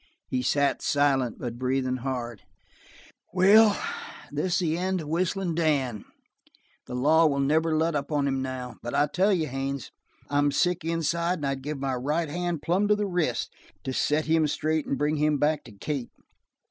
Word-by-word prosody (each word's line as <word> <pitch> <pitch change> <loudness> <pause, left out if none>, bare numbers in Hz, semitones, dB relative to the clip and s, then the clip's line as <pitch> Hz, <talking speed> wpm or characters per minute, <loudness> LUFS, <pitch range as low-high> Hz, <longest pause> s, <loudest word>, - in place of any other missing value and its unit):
He 130 - 0
sat 140 +2 +1
silent, 135 -4 +1
but 120 -1 -6
breathing 130 0 0
hard. 120 -4 -4 0.9
"Well, 200 +3 +6 0.5
this 150 +5 -1
is - - +3
the 165 -3 0
end 185 +1 -1
of 150 - -8
Whistlin' 180 +2 -1
Dan. 140 -9 0 0.8
The 125 - -5
law 155 +6 +4
will 140 -2 0
never 155 +3 +2
let 165 +1 +1
up 145 +1 -3
on 145 -2 +1
him 135 -1 0
now; 130 -1 -5
but 120 - -4
I 145 - +4
tell 195 +3 +3
you, 175 -5 +1
Haines, 135 0 -4 0.4
I'm 145 0 +2
sick 175 +2 +1
inside 170 +2 0
and 145 - -4
I'd 135 -1 -2
give 150 +2 -4
my 135 -1 -2
right 150 +6 -1
hand 175 -1 -3
plumb 185 +5 +2
to 210 - +4
the 210 0 -1
wrist 175 -10 -1 0.3
to 130 - -3
set 150 +4 +1
him 160 -1 +3
straight 155 +1 -1
and 140 - -1
bring 150 +1 0
him 150 0 +2
back 150 +1 +1
to 115 - -12
Kate. 130 +5 -4
150 Hz, 185 wpm, -27 LUFS, 135-165 Hz, 0.9 s, Well